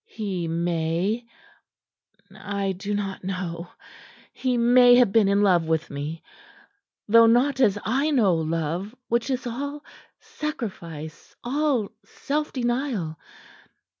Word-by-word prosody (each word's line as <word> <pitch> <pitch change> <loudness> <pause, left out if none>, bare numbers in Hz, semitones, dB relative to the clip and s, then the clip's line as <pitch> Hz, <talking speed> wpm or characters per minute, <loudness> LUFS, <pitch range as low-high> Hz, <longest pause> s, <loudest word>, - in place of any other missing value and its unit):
He 190 -6 -4
may 170 +6 -1 1.1
I 200 -1 -3
do 200 +2 -4
not 195 -2 -4
know 180 -2 -4 0.6
he 255 -2 -1
may 245 +1 +6
have 245 -5 +5
been 215 -1 +4
in 200 +1 +3
love 180 -4 +3
with 160 0 -1
me 145 +3 -5 0.8
though 230 +2 +7
not 260 +4 +3
as 210 -6 +4
I 270 +8 +1
know 230 - +3
love, 165 +6 -2
which 235 +2 0
is 260 0 -2
all 285 +5 -5 0.3
sacrifice, 170 - -7
all 265 -4 0
self 295 +8 -3
denial. 240 - -2
205 Hz, 115 wpm, -24 LUFS, 170-245 Hz, 1.1 s, though